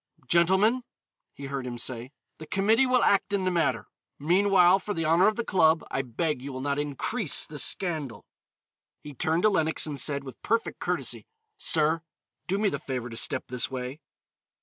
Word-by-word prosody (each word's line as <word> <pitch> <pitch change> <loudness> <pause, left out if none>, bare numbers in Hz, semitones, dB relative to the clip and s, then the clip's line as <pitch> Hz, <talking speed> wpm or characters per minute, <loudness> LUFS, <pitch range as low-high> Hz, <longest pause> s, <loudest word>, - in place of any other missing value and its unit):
"Gentlemen," 190 +8 +3 0.5
he 140 - -10
heard 135 -2 -4
him 120 -1 -5
say, 125 +1 -2 0.3
"the 155 - -9
committee 220 - +3
will 255 0 +3
act 200 +1 +2
in 195 -2 0
the 185 - +1
matter; 140 - 0 0.3
meanwhile, 185 +3 +4
for 205 +1 -5
the 165 - -1
honor 165 +5 +4
of 215 - +2
the 235 - -3
club, 160 -3 +3
I 135 - 0
beg 135 +3 -2
you 140 +2 -6
will 130 - -6
not 140 +1 -1
increase 150 - -1
the 150 -1 -8
scandal." 155 - -2 0.8
He 145 - -9
turned 160 +6 0
to 215 - +6
Lenox 160 -5 +1
and 145 -3 -4
said, 140 +1 +1
with 130 -2 -11
perfect 230 0 -1
courtesy, - - -2 0.3
"Sir, 160 +1 +2 0.5
do 190 +2 0
me 210 +1 +1
the 140 - -4
favor 125 -4 -5
to - - -7
step 130 +3 +1
this 125 -1 -1
way." 130 +2 -5
160 Hz, 185 wpm, -27 LUFS, 135-190 Hz, 0.8 s, to